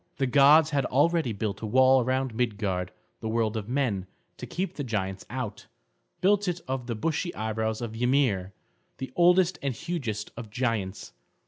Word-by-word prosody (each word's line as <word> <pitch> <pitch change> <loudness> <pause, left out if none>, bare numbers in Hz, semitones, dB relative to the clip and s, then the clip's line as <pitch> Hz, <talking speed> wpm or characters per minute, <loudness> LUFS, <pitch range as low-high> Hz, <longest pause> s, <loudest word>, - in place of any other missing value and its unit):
The 135 - +1
gods 145 +4 +6
had 140 -3 +1
already 155 0 +2
built 105 0 -3
a 110 - -3
wall 130 +3 +5
around 130 0 -1
Midgard, 105 -6 -1 0.3
the 110 - -4
world 110 -1 0
of 110 0 -4
men, 120 -8 0 0.3
to - - -7
keep 190 +2 -3
the 145 - -4
giants 95 -6 -3
out; 120 -3 -5 0.5
built 200 +1 +3
it 175 -1 -1
of 130 -2 -3
the 115 - -2
bushy 165 - -2
eyebrows 110 0 -2
of 115 -2 -5
Ymir, 120 -6 +1 0.5
the 130 -1 -6
oldest 180 +1 +4
and 140 -3 -2
hugest 125 - -4
of 115 -2 -8
giants. 105 - -2
125 Hz, 165 wpm, -27 LUFS, 110-140 Hz, 0.5 s, gods